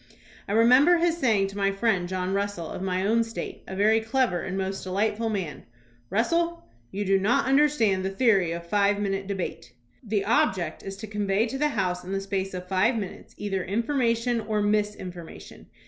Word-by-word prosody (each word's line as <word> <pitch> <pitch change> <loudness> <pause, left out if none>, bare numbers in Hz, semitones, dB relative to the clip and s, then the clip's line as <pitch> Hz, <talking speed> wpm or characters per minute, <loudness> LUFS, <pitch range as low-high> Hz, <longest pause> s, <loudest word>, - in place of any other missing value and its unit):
I 200 - -2
re 225 +1 +5
member 280 +9 +6
his 340 0 +2
saying 220 -8 +3
to 195 - -10
my 195 0 +2
friend 195 -3 0
John 185 0 -2
Russell 200 -4 -2
of - - -6
my 185 0 -1
own 230 +3 +3
State, 225 0 -6
a 190 - -6
very 215 +3 +3
clever 225 -5 0
and 190 +1 -4
most 195 0 -3
delightful 210 +4 -1
man: 190 -8 -3 0.5
"Russell, 335 - 0 0.2
you 205 +1 -3
do 195 0 +3
not 210 +5 +2
understand 265 -8 +3
the 190 - -1
theory 195 -5 +2
of 170 0 -5
five 200 +2 +2
minute 195 -1 -2
debate. 185 -11 -5 0.3
The 210 -5 -1
object 190 -7 +1
is 195 0 -7
to 210 - -7
convey 210 0 0
to 255 +3 -4
the 300 - +3
House 180 -7 -1
in 185 +2 -5
the 195 - 0
space 195 -1 -3
of 180 0 -6
five 195 +6 +2
minutes 200 -4 -7
either 195 -3 -2
information 235 +2 0
or 215 0 -1
misinformation. 205 -5 -3
200 Hz, 190 wpm, -26 LUFS, 190-230 Hz, 0.5 s, member